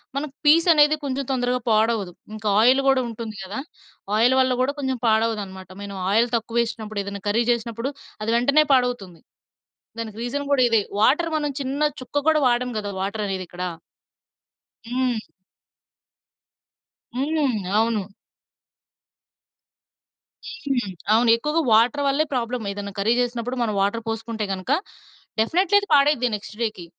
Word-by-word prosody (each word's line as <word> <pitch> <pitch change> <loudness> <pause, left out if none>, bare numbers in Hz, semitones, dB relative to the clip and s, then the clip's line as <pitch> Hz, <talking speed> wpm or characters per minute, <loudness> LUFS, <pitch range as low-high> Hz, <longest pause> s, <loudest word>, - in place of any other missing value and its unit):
మనకి 280 0 -3
పీసనేది 310 -1 +6
కొంచెం 275 0 -2
తొందరగా 250 -1 0
పాడవదు. 215 -3 +2 0.2
ఇంకా 215 0 -5
ఆయిలు 255 +5 +5
గూడా 270 -1 +4
ఉంటుంది 225 -1 -7
కదా! 195 +5 -5 0.6
ఆయిలు 240 +4 +4
వల్ల 260 -1 +3
గూడా 275 +3 +1
కొంచెం 265 -2 -1
పాడవదనమాట. 215 -4 0
మనం 200 -1 -7 0.2
ఆయిల్ 230 +3 +3
తక్కువేషినప్పుడు 225 -2 -2
ఏదన్నా 200 0 -6
కర్రీ 225 +3 +2
జేసినప్పుడు 235 +3 -2 0.3
అది 220 - -2
వెంటనే 280 +6 +4
పాడవుతుంది. 245 -9 0 0.8
దానికి 220 -1 -6
రీజన్ 285 +4 -3
గూడా 265 -2 +4
ఇదే. 225 -2 +3 0.2
వాటర్ 310 +9 +3
మనం 295 -1 -1
చిన్న 275 +2 -2 0.2
చుక్క 255 +3 -3
కూడా 310 -1 +4
వాడం 245 +1 +1
గదా! 205 -1 -4
వాటరనేదిక్కడ. 190 -3 -4 1.3
హ్మ్. 250 -1 0 2.0
హ్మ్. 280 -2 0 0.2
అవును. 225 -3 +1 2.7
హ్మ్. 245 -7 0 0.2
అవును. 230 +1 +4
ఎక్కువగా 300 +6 0
వాటర్ 240 +6 +4
వల్లే 280 +3 +2
ప్రాబ్లమ్. 245 -2 -2
ఏదన్నా 200 0 -6
కర్రీ 220 +4 +2
చేసినప్పుడు 245 +1 -3
మనం 215 -3 -1
వాటర్ 220 +3 0
పోసుకుంటే 225 -1 -3
గనుక 185 +6 -4 0.7
డెఫినిట్లీ 370 - +3
అది 405 - -7
పాడైద్ది 280 -3 +4
నెక్స్ట్ 210 +1 -9
డేకి. 215 -6 -3
235 Hz, 125 wpm, -23 LUFS, 215-270 Hz, 2.7 s, పీసనేది